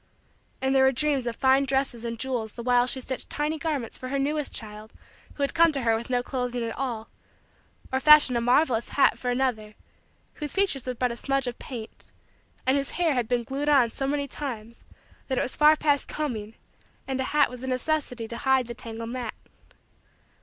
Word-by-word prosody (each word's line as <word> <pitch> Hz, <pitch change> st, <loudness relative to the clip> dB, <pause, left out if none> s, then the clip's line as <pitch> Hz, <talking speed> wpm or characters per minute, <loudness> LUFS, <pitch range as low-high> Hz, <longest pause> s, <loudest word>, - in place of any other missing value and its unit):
And 265 Hz, 0 st, +2 dB
there 265 Hz, -1 st, +5 dB
were 265 Hz, -, +5 dB
dreams 275 Hz, -2 st, 0 dB
of 235 Hz, -, -2 dB
fine 265 Hz, +1 st, +3 dB
dresses 265 Hz, -3 st, -1 dB
and 230 Hz, -1 st, -4 dB
jewels 235 Hz, -3 st, -2 dB
the 235 Hz, -, -7 dB
while 245 Hz, 0 st, +3 dB
she 260 Hz, -, 0 dB
stitched 260 Hz, 0 st, -5 dB
tiny 300 Hz, +1 st, -2 dB
garments 290 Hz, -8 st, -3 dB
for 255 Hz, -, -6 dB
her 275 Hz, -, -1 dB
newest 295 Hz, +1 st, -1 dB
child 215 Hz, 0 st, -8 dB, 0.4 s
who 285 Hz, -, -2 dB
had 280 Hz, -, 0 dB
come 335 Hz, 0 st, +5 dB
to 275 Hz, -3 st, -2 dB
her 225 Hz, -1 st, +3 dB
with 230 Hz, +2 st, -5 dB
no 245 Hz, -1 st, +1 dB
clothing 250 Hz, -2 st, -3 dB
at 230 Hz, -1 st, -4 dB
all, 235 Hz, -4 st, -3 dB, 0.9 s
or 260 Hz, -, +2 dB
fashioned 300 Hz, -3 st, +7 dB
a 235 Hz, -, +1 dB
marvelous 245 Hz, -1 st, +2 dB
hat 280 Hz, -, +3 dB
for 250 Hz, -, -2 dB
another 245 Hz, -4 st, -1 dB, 0.7 s
whose 295 Hz, -, -4 dB
features 375 Hz, -11 st, +1 dB
were 250 Hz, -, -2 dB
but 250 Hz, +1 st, 0 dB
a -, -, -4 dB
smudge 275 Hz, +2 st, -1 dB
of 245 Hz, -1 st, -5 dB
paint 230 Hz, -5 st, -9 dB, 0.5 s
and 260 Hz, +2 st, +3 dB
whose 275 Hz, 0 st, -2 dB
hair 340 Hz, -3 st, +2 dB
had 245 Hz, -4 st, 0 dB
been 240 Hz, 0 st, 0 dB
glued 275 Hz, +5 st, -2 dB
on 260 Hz, -6 st, +4 dB
so 270 Hz, -, -3 dB
many 285 Hz, 0 st, -1 dB
times 235 Hz, -5 st, -7 dB, 0.4 s
that 260 Hz, -, -1 dB
it -, -, +2 dB
was 255 Hz, -, -3 dB
far 305 Hz, +1 st, +6 dB
past 290 Hz, -3 st, +1 dB
combing 225 Hz, -8 st, -4 dB, 0.5 s
and 265 Hz, -1 st, -1 dB
a -, -, -1 dB
hat 295 Hz, -1 st, +3 dB
was 250 Hz, -1 st, -9 dB
a 260 Hz, -, -5 dB
necessity 255 Hz, -3 st, -1 dB
to 235 Hz, -, -6 dB
hide 265 Hz, -1 st, +2 dB
the 235 Hz, -, -6 dB
tangled 230 Hz, 0 st, -7 dB
mat. 245 Hz, -3 st, -4 dB
255 Hz, 210 wpm, -26 LUFS, 235-280 Hz, 0.9 s, fashioned